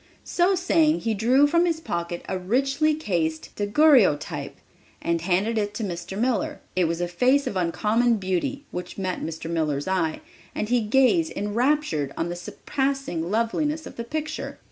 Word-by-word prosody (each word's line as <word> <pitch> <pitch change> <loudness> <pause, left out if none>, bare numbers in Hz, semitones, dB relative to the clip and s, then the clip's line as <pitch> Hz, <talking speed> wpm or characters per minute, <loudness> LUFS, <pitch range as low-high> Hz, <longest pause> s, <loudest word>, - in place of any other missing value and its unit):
So 365 +2 +2
saying, 330 -3 +2
he 225 -1 0
drew 245 +7 +4
from 335 +4 +3
his 330 -2 0
pocket 170 - -4
a 190 - -2
richly 275 - +1
cased 170 - -2
daguerreotype, 210 - +3 0.4
and 170 0 -1
handed 195 +6 +1
it 205 0 -2
to 225 - -3
Mr. 175 0 -5
Miller. 235 -2 0 0.2
It 185 -1 +3
was 165 +1 -1
a 175 - 0
face 255 +11 +2
of - - -3
uncommon 215 +7 +2
beauty 200 - -2
which 180 0 -6
met 185 -2 -2
Mr. 160 0 -5
Miller's 155 -3 -1
eye, 175 -4 0 0.3
and 215 - -2
he 245 -1 +3
gazed 265 +9 +3
enraptured 210 - 0
on 165 - -1
the 175 - -3
surpassing 265 - -3
loveliness 295 +9 0
of - - -10
the 235 - -4
picture. 310 +5 -4
215 Hz, 165 wpm, -25 LUFS, 175-280 Hz, 0.4 s, drew